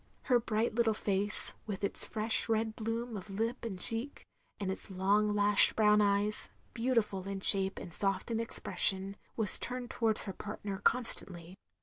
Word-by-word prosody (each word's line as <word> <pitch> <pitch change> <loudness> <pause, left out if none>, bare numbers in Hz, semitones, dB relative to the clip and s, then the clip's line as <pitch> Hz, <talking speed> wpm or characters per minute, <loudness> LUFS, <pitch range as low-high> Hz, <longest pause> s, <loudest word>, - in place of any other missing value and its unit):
Her 245 -2 +2
bright 225 0 -2
little 225 -1 +1
face 205 0 +1
— - - -19
^with 200 -1 -5
its 200 - -2
fresh 220 0 -1
red 220 0 -1
bloom 230 +1 -4
of 200 0 -8
lip 225 +6 -3
and 200 -6 -6
cheek, 230 +8 0 0.3
and 195 -2 -3
its 190 - -1
long 200 +3 +1
lashed 205 0 +4
brown 210 -1 +4
eyes, 205 +1 +1 0.2
beautiftd 230 -6 -1
in 195 0 -4
shape 195 -1 +6
and 170 - -9
soft 195 +4 -2
in 225 - -1
expression 195 -3 -1
— - - -38
^was 220 -3 +5
turned 250 -1 -5
towards 220 -2 -1
her 195 - -6
partner 205 -1 -7
constantly. 185 -7 -1
210 Hz, 170 wpm, -31 LUFS, 195-225 Hz, 0.3 s, shape